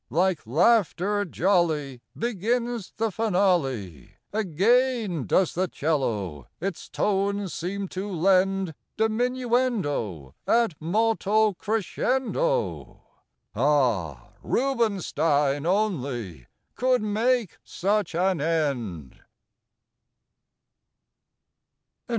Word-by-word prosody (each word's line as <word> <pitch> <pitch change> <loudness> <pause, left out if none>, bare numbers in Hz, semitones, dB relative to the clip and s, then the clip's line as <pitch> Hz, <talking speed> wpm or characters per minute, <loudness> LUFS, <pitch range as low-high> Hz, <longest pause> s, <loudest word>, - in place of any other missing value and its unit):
Like 175 -1 0
laughter 200 - +2
jolly 160 -8 0 0.2
Begins 235 0 -1
the 225 0 0
finale; 175 - 0 0.2
Again 215 - +1
does 185 - +2
the 185 +2 0
'cello 110 - -2
its 190 0 -5
tones 200 -1 0
seem 195 +3 -3
to 195 +3 -5
lend 190 0 +2 0.2
Diminuendo 220 - 0
ad 230 -5 +3
molto 215 +3 +2
crescendo. 260 - -1 0.5
Ah! 110 - +1
Rubinstein 165 - +1
only 130 - -1 0.3
could 250 -2 +1
make 225 0 0
such 200 -2 -1
an 180 -2 +1
end! 125 - -2
190 Hz, 75 wpm, -25 LUFS, 145-220 Hz, 0.5 s, ad